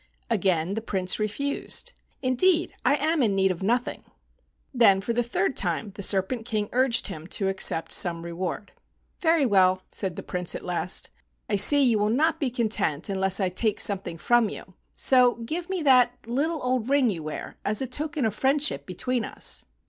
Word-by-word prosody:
Again 185 -4 0
the 220 - -3
Prince 190 -4 -1
refused. 280 - -1 0.3
"Indeed, 325 +7 +1
I - - +3
am 310 +2 0
in 210 -5 +1
need 190 -1 +2
of 180 - -6
nothing." 235 +5 -1 0.7
Then 225 -6 +4
for 230 +4 -3
the 240 - +1
third 235 -1 -1
time 185 +3 -1
the 200 - -8
Serpent 200 +5 +1
King 215 -3 -3
urged 250 -2 +1
him 160 -3 -8
to 195 +1 -1
accept 190 -4 +1
some 170 -2 +3
reward. 175 +3 -5 0.5
"Very 325 -4 +2
well," 185 -4 +2
said 190 -4 -3
the - - -7
Prince 180 -1 -2
at - - -7
last, 180 +1 -2 0.4
"I 210 - -1
see 280 +8 +7
you 235 -5 +2
will 210 +1 +1
not 305 +8 +1
be 275 - -1
content 215 - -1
unless 190 0 +1
I 190 -2 0
take 210 +3 -1
some¬ 195 -2 +2
thing 170 -1 -7
from 235 +6 +2
you, 185 - -10 0.2
so 250 -2 +4
give 315 +10 -6
me 375 -4 -3
the 255 -3 +5 0.2
little 290 +7 -2
old 250 -1 -1
ring 275 -5 +2
you 170 -5 -6
wear, 155 0 -7
as 210 +1 +1
a 265 - 0
token 290 +1 -2
of 220 - -1
friendship 265 - 0
between 245 +6 -2
us." - - 0
220 Hz, 185 wpm, -25 LUFS, 190-260 Hz, 0.7 s, see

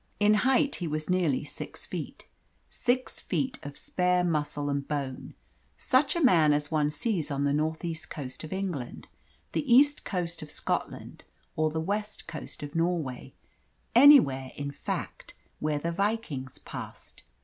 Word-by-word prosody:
In 210 0 +5 0.2
height, 275 +2 +3
he 175 - -3
was 155 +3 -2
nearly 170 -8 +2
six 145 - -8
feet - - -6 0.5
six 250 +1 -1
feet 260 -1 -2
of 145 -2 -8
spare 180 0 +1
muscle 150 -3 -1
and 140 -1 -1
bone 140 -3 -4 0.4
such 275 +4 +2
a 340 - +1
man 165 - +6
as 145 +1 -1
one 150 -2 +2
sees 165 +2 -1
on 140 -1 -1
the 140 0 +2
north 160 +3 -1
east 165 -1 -4
coast 130 -2 -6
of 155 - -8
England, 180 -10 -4 0.4
the 280 -4 -1
east 285 +4 +6
coast 175 -3 -2
of 155 - -8
Scotland, - - -4 0.3
or 155 0 +2
the 160 +1 -2
west 205 +5 -3
coast - - -8
of 145 0 -7
Norway 165 -7 -1 0.6
anywhere, 230 - +7
in 140 0 -4
fact, 140 - -5 0.2
where 150 -1 0
the 165 +3 -2
Vikings 180 - -2
passed. - - -9
160 Hz, 155 wpm, -28 LUFS, 145-205 Hz, 0.6 s, anywhere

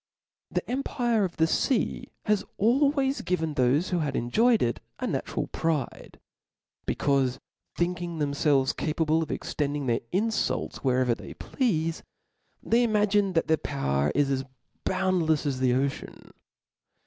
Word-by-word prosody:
The - - -2
empire 240 -4 0
of 175 - -6
the 160 - +4
fea 230 +8 0 0.2
has 210 -1 +2
always 270 +4 +2
given 160 -4 -1
thofe 135 +6 +2
who 180 - 0
h^ve 145 -4 -1
enjoyed 225 - +3
it 120 -1 0 0.2
a - - -3
natural - - -2
pride; 155 -6 -3 0.7
becaufe 135 -3 +1 0.4
think 175 0 -1
ing 170 -1 -4
themfelves 140 -2 +1
capable 160 0 +1
of 160 - -3
extending 145 -1 -2
their 120 -2 +1
infults 220 +4 0
wherever 130 -2 +2
they - - -9
pleafe, 165 - -1 0.6
they 235 +2 +3
imagme 205 -3 +2
that 165 - +3
their 160 - +3
power 75 - -1
is 145 -1 +2
as 135 -1 0 0.4
boundlefs 180 -5 +1
as 135 -3 -1
the 125 -1 +3
ocean. 135 +1 -3
160 Hz, 135 wpm, -27 LUFS, 140-205 Hz, 0.7 s, the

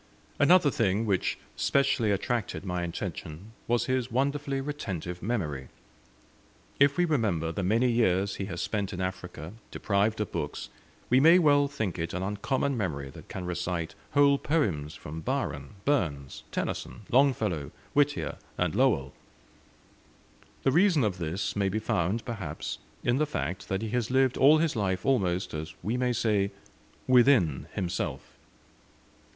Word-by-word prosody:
Another 155 0 +6
thing 110 -2 +1
which 100 -4 0 0.2
specially 135 -5 +2
attracted 105 +1 -1
my 90 -1 -2
attention 85 +2 -6 0.2
was 120 0 +2
his 130 -1 0
wonderfully 140 +2 0
retentive 95 - -4
memory. 75 - -2 1.1
If 140 0 +4
we 175 - +4
remember 100 - 0
the 100 - -3
many 110 +7 +2
years 100 -5 +2
he 100 - -3
has 90 -3 -4
spent 100 -2 -2
in 90 - -5
Africa, 90 -2 -5 0.2
deprived 105 +2 0
of 105 - -2
books, - - -4 0.4
we 125 - +6
may 165 +5 +7
well 145 -4 +4
think 110 -11 -3
it 80 +1 -3
an 90 - -2
uncommon 130 +8 -1
memory 70 - -3
that - - -13
can 95 -2 -5
recite 90 -1 -3 0.2
whole 140 -1 +5
poems 90 - 0
from 80 +2 -7
Byron, 70 +1 -3
Burns, 80 - -1
Tennyson, - - -3
Longfellow, 110 - +2 0.2
Whittier, 145 0 +1 0.2
and - - 0
Lowell. 70 0 +2 1.5
The 135 - +3
reason 170 -2 +4
of 95 -4 -1
this 85 +4 -2
may 100 -1 +1
be 100 - -1
found, 110 0 -1
perhaps, 100 - -5 0.2
in 120 +1 +2
the 155 +1 +1
fact, 95 - -4
that 95 +3 -1
he 110 - -3
has 120 0 -1
lived 130 0 +3
all 145 +4 +6
his 160 -2 +1
life 95 -4 -1
almost, 95 -9 +1 0.3
we 110 +4 -1
may 125 0 +1
say, 110 -4 +1 0.6
within 120 - +4
himself. 90 -3 -3
105 Hz, 145 wpm, -28 LUFS, 90-135 Hz, 1.5 s, may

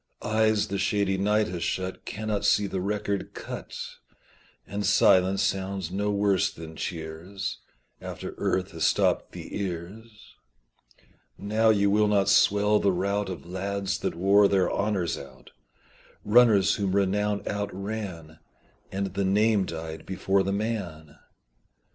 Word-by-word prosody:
Eyes 110 -1 +2
the 100 - -2
shady 100 -1 +1
night 105 +2 +2
has 90 -2 -5
shut 95 0 -3
Cannot 105 -1 -3
see 105 0 +3
the 95 -2 -3
record 100 0 -2
cut, - - -7 0.9
And 100 +1 -4
silence 95 0 +4
sounds 95 -2 -2
no 100 +2 -1
worse 100 -2 +2
than 80 0 -10
cheers 85 +4 -5 0.4
After - - -6
earth 95 -1 0
has - - -4
stopped - - +2
the - - -8
ears: 100 +5 -7 1.0
Now 110 +2 +1
you 100 -2 +3
will 105 +1 +3
not 100 -2 +2
swell 105 0 +4
the 100 - +2
rout 100 +2 -1
Of 85 -6 -7
lads 95 +2 -3
that - - -2
wore 100 +3 +5
their 95 -2 +2
honours 100 -6 -1
out, 70 -1 -13 0.7
Runners 105 -3 +5
whom 100 -2 -1
renown 100 +1 +1
outran 100 -5 -5 0.5
And 95 -1 -3
the 100 - -1
name 105 +1 +3
died 80 -1 -7
before 95 +1 +1
the 95 +1 -1
man. 100 -8 -4
100 Hz, 135 wpm, -26 LUFS, 95-105 Hz, 1.0 s, wore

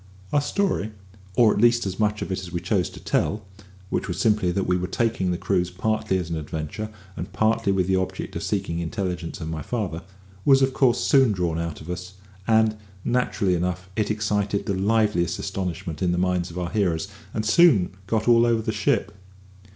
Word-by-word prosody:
Our 145 - +4
story, 145 - -1 0.4
or 115 -3 +5
at - - 0
least 120 -1 +4
as 95 +1 -4
much 105 0 +1
of - - -6
it 95 - -1
as 90 -2 -8
we 85 - -2
chose 90 +1 0
to - - -11
tell 105 -1 -1 0.5
(which - - -1
was 90 -2 -3
simply 105 -3 +2
that 95 +2 -1
we 90 - +2
were 90 0 -1
taking 110 -2 0
the 90 - 0
cruise 90 -2 0
partly 100 0 0
as 90 -3 -3
an 80 - -1
adventure, 80 +7 -5 0.3
and 85 +3 -6
partly 110 +1 +2
with 95 -2 +2
the 95 +1 +2
object 95 0 -3
of - - -3
seeking 95 -5 -2
intelligence 90 -1 -3
of 80 - -4
my 80 -1 -4
father), 95 -3 -3 0.4
was 135 -1 +5
of 135 0 +2
course 130 -4 +3
soon 135 -5 +4
drawn 85 -3 -1
out 85 -2 -4
of 80 - -10
us; 90 +1 -6 0.3
and, 110 -1 +3 0.3
naturally 120 -6 +1
enough, 90 +1 -2
it 105 -2 0
excited 105 -1 0
the 100 - 0
liveliest 105 -2 +1
astonishment 85 -4 -4
in 90 -2 +2
the 90 - 0
minds 90 -1 0
of 85 - -9
our 90 -1 -3
hearers, 95 -5 0 0.2
and 110 - -2
soon 110 - +5 0.2
got 110 +2 0
all 120 -1 +6
over 115 -1 +2
the 110 - -1
ship. 105 -1 0
95 Hz, 205 wpm, -24 LUFS, 90-110 Hz, 0.5 s, all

